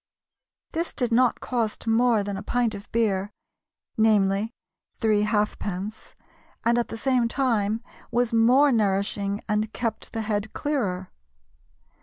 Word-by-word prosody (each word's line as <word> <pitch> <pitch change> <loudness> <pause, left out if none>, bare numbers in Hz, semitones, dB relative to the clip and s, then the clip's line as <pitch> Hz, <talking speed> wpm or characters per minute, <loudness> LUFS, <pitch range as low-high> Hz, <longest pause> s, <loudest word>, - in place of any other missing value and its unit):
This 335 +1 -3
did 245 -3 0
not 245 +1 +3
cost 230 -4 -2
more 225 -1 +3
than 200 0 -4
a 195 - -5
pint 235 +1 0
of 200 +1 -9
beer 205 -3 +1 0.7
"namely, 210 -1 +3 0.4
three 215 -2 +2
halfpence" 210 -1 -2 0.5
and 235 +1 +4
at 240 - -1
the 225 - -6
same 250 -1 +2
time 230 -4 0 0.3
was 240 0 0
more 250 +6 +5
nourishing 200 -2 0
and 210 0 0
kept 230 -3 -3
the 225 - -3
head 210 0 -2
clearer. 195 -11 -2
220 Hz, 130 wpm, -25 LUFS, 205-240 Hz, 0.7 s, more